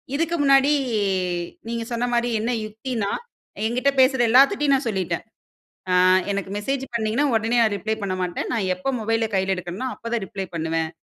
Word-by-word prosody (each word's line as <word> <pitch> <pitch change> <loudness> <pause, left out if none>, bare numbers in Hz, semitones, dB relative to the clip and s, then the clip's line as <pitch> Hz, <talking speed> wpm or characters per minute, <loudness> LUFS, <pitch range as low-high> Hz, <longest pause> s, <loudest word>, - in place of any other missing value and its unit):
இதுக்கு 330 +2 0
முன்னாடி, 275 +1 +5 1.0
நீங்க 230 0 -3
சொன்ன 240 +1 -1
மாரி 240 0 +1
என்ன 230 +3 -1
யுக்தின்னா? 220 -1 -3 0.5
என்கிட்ட 250 +5 +1
பேசுற 260 -1 +4
எல்லாத்துட்டையும் 275 +3 +5
நான் 265 -2 -2
சொல்லிட்டேன், 180 -4 -2 0.7
"அ - - +3 0.4
எனக்கு 195 -1 -3
மெசேஜ் 270 +5 -2
பண்ணீங்கன்னா 230 +5 +1
உடனே 225 +2 +1
நா - - +5
ரிப்ளை 220 +4 -2
பண்ண 185 -1 -2
மாட்டேன். 180 -1 -3
நா 230 - 0 0.2
எப்போ 185 - -5
மொபைல 225 0 0
கையில 190 0 +1
எடுக்கறனோ, 185 +8 -4
அப்ப 230 - -7
தான் 220 -4 -1
ரிப்ளை 190 +1 -5
பண்ணுவேன்." 160 0 -1
225 Hz, 165 wpm, -23 LUFS, 195-260 Hz, 1.0 s, முன்னாடி